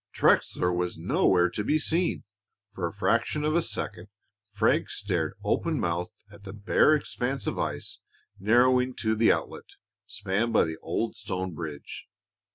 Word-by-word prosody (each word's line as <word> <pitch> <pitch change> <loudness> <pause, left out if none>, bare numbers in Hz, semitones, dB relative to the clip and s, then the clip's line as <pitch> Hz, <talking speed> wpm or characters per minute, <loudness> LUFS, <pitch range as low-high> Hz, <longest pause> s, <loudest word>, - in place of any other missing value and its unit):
Trexler 90 0 +2
was 90 -1 -2
nowhere 90 +1 +3
to 105 - -3
be 150 +8 +2
seen! 165 +3 0 0.5
For 90 -4 -2
a - - -6
fraction 115 +8 0
of 155 +1 +1
a 170 - +4
second 160 - -3 0.4
Frank 105 - +1
stared - - -2
open - - 0
mouthed 85 +1 -2 0.2
at 100 -1 -14
the 95 -1 -8
bare 105 +8 +3
expanse 135 -2 -3
of - - -2
ice - - -2 0.4
narrowing 125 +5 +3
to 110 -1 0
the 110 +1 +4
outlet, - - -4 0.3
spanned 105 +5 -2
by - - +5
the 80 0 -4
old - - -3
stone 95 -1 -4
bridge. 75 -3 -7
105 Hz, 155 wpm, -27 LUFS, 90-125 Hz, 0.5 s, by